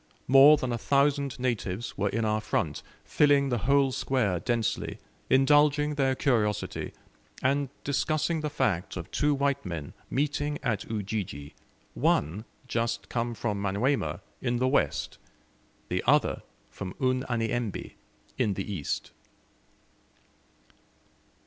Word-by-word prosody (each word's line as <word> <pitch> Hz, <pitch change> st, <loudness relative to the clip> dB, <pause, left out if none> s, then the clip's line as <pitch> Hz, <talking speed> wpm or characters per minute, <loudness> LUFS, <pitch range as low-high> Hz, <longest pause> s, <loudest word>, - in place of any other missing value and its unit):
More 135 Hz, +4 st, +8 dB
than 130 Hz, -3 st, -2 dB
a 120 Hz, -, -2 dB
thousand 140 Hz, +1 st, +1 dB
natives 120 Hz, -4 st, -2 dB
were 100 Hz, 0 st, 0 dB
in 115 Hz, +2 st, -1 dB
our 110 Hz, 0 st, +1 dB
front, 105 Hz, -, -1 dB, 0.2 s
filling 140 Hz, -2 st, +3 dB
the 120 Hz, -2 st, 0 dB
whole 140 Hz, +3 st, +3 dB
square 115 Hz, -9 st, 0 dB
densely, 120 Hz, 0 st, -1 dB, 0.3 s
indulging 145 Hz, +2 st, +4 dB
their 135 Hz, -2 st, +1 dB
curiosity, 110 Hz, -7 st, 0 dB, 0.5 s
and 140 Hz, +1 st, +1 dB
discussing 155 Hz, +3 st, 0 dB
the 150 Hz, -, -2 dB
fact 95 Hz, -, -1 dB
of 90 Hz, +1 st, -7 dB
two 145 Hz, -1 st, +2 dB
white 140 Hz, 0 st, 0 dB
men 85 Hz, -6 st, -5 dB, 0.2 s
meeting 145 Hz, +1 st, -1 dB
at 110 Hz, 0 st, -2 dB
Ujiji 100 Hz, -9 st, -4 dB, 0.4 s
one 90 Hz, +10 st, +1 dB, 0.2 s
just 115 Hz, -1 st, -2 dB
come 120 Hz, 0 st, -2 dB
from 105 Hz, -3 st, -2 dB
Manyuema, 105 Hz, +5 st, 0 dB, 0.2 s
in 120 Hz, -2 st, 0 dB
the 130 Hz, +2 st, +1 dB
west, 110 Hz, -, 0 dB, 0.7 s
the -, -, -1 dB
other -, -, +3 dB, 0.3 s
from 95 Hz, -2 st, -7 dB
Unyanyembe, 120 Hz, -4 st, -1 dB, 0.5 s
in 100 Hz, -3 st, +1 dB
the 100 Hz, +2 st, -4 dB
east. 75 Hz, -7 st, -3 dB
120 Hz, 120 wpm, -28 LUFS, 105-140 Hz, 0.7 s, More